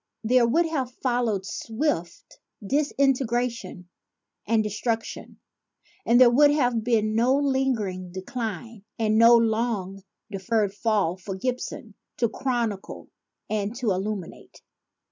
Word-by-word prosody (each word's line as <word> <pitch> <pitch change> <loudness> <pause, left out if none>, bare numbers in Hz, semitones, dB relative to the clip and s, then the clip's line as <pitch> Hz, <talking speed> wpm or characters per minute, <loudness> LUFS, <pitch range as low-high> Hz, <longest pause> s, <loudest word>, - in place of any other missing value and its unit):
There 240 +1 +4
would 330 +9 +2
have 275 -6 -2
followed 240 -6 -1
swift 220 - -4 0.3
disintegration 245 -7 0 0.6
and 225 0 +2
destruc 225 +2 -1
tion; - - -10 0.7
and 235 +1 +5
there 250 -2 +7
would 290 +4 +6
have 245 -6 +1
been 215 -2 +1
no 240 +4 +3
lingering 250 -10 -1
Decline 220 +2 -6
and 220 -1 +2
no 235 +1 +8
long 220 -4 -1 0.3
deferred 200 +1 -1
Fall 205 -4 0
for 190 +1 -6
Gibbon 245 0 -4 0.2
to 235 - +2
chronicle 235 -7 -3 0.4
and 215 +1 -2
to 240 -4 -1
illuminate. 195 -1 -5
230 Hz, 115 wpm, -25 LUFS, 205-250 Hz, 0.7 s, no